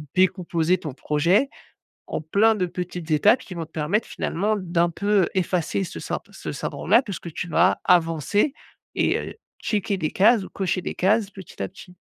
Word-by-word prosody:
décomposer 180 -2 +2
ton 150 -6 -6
projet 170 - +2 0.6
en - - -3
plein 205 +8 +3
de 185 -3 0
petites 175 -2 -5
étapes 210 - +4
qui 195 - -9
vont 165 -1 -4
te 160 - -25
permettre 170 +9 -1
finalement 210 +5 -1
d'un 175 -2 +1
peu 200 +2 +2
effacer 180 0 0
ce 175 - -7 0.3
ce - - -6
syndrome-là 220 +8 +2
puisque 195 -6 -6
tu 180 - -4
vas 180 +4 +3
avancer 175 - +2 0.4
et - - +2
heu, - - -6 0.3
checker 205 -2 -1
des 155 -4 -2
cases 210 +1 +4
ou - - -11
cocher 185 -1 -1
des - - -5
cases 205 +2 +2
petit 190 - -11
à - - -2
petit? 180 -1 -14
180 Hz, 175 wpm, -24 LUFS, 170-205 Hz, 0.6 s, étapes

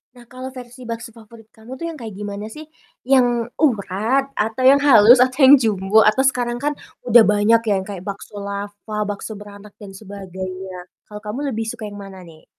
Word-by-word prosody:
Nah 240 -1 -17
kalau 255 +1 -8
versi 250 0 -11
bakso 230 0 -6
favorit 225 -1 -17
kamu 225 +3 -13
tuh 300 +6 -7
yang 325 - -8
kayak 225 -4 -8
gimana 205 +1 -6
sih? 305 +8 -10 0.3
Yang 245 -2 +2
urat 240 - 0
atau 220 +4 -2
yang 265 +2 +6
halus 250 -4 +7
atau 255 +3 +2
yang 270 +2 +9
jumbo 215 -2 +2
atau 215 +5 +3
sekarang 245 -2 0
kan 295 +1 0 0.4
udah 235 0 +8
banyak 210 +2 +3
ya 200 - +3
kayak 190 -2 -8
bakso 200 +1 -8
lava, 200 +1 -7 0.2
bakso 205 +2 -5
beranak 205 0 -12
dan 205 - -9
sebagainya. 190 -2 -8 0.2
Kalau 210 - -8
kamu 210 +5 -5
lebih 225 -3 -3
suka 220 -1 -6
yang 205 - -10
mana 195 -2 -10
nih? 165 -3 -16
220 Hz, 185 wpm, -20 LUFS, 200-250 Hz, 0.4 s, yang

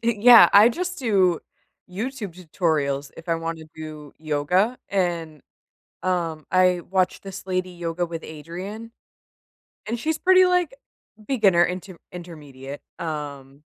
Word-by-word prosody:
Yeah, 235 +1 +7
I 210 +3 +8
just 360 +7 -4
do 190 - +2 0.5
YouTube 215 -1 -5
tutorials 155 -5 -1
if 165 +1 -12
I 165 - +2
wanna 165 -1 -5
do 155 -2 -9
yoga, 160 +10 0
and, 170 -6 -2 0.6
um, 170 -4 -1
I 180 -1 +3
watch 185 -1 0
this 195 -1 -9
lady: 185 -1 -2
Yoga 175 0 -3
With 165 -1 -6
Adriene, 180 +9 -8 1.0
and 230 +2 -3
she's 315 +5 -1
pretty 370 0 +6
like 360 +5 +1 0.5
beginner 195 -10 +4
inter 180 0 -5 0.2
intermediate, 145 -6 -9 0.2
um, 145 -3 -6
180 Hz, 120 wpm, -23 LUFS, 160-205 Hz, 1.0 s, I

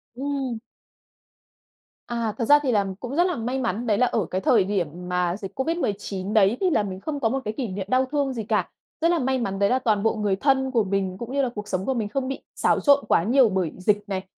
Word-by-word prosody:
Ừm. 270 -3 -3 1.5
À, 230 -3 -2
thật 230 - -1
ra 290 +3 +7
thì 260 - +1
là 205 -3 +2
cũng 255 +3 -5
rất 350 - +4
là 355 - -1
may 245 +4 -2
mắn 235 -1 -2
đấy 210 - +2
là 250 - +4
ở 215 -5 0
cái 185 +1 -1
thời 215 -1 +4
điểm 190 -4 -1 0.2
mà 180 0 0
dịch 200 +5 -9
COVID-19 210 - -2
đấy, 215 +2 +4
thì 370 - +3
là 220 -10 +2
mình 190 -1 -5
không 290 +4 -4
có 225 - +1
một 270 +2 -1
cái 215 - -2
kỷ 255 -4 -2
niệm 190 0 -4
đau 260 +1 +3
thương 280 -3 0
gì 225 -3 -4
cả. 210 0 0 0.3
Rất 335 +1 +3
là 340 - +2
may 260 0 0
mắn 195 -4 -3
đấy 200 - +3
là 255 +1 +2
toàn 215 -4 +1
bộ 225 - +2
người 205 -3 0
thân 265 +3 +1
của 230 -4 +2
mình, 190 -1 -2
cũng 240 +4 -7
như 280 - +2
là 255 - 0
cuộc 210 0 -6
sống 185 -1 -2
của 265 - 0
mình 215 -4 -2
không 265 +2 -2
bị 270 - -4
xáo - - +2
trộn 285 -1 +4
quá 165 - +3
nhiều 245 +1 +4
bởi 185 -4 -1
dịch 205 +2 +1
này, 190 -1 -3
225 Hz, 260 wpm, -24 LUFS, 200-265 Hz, 1.5 s, ra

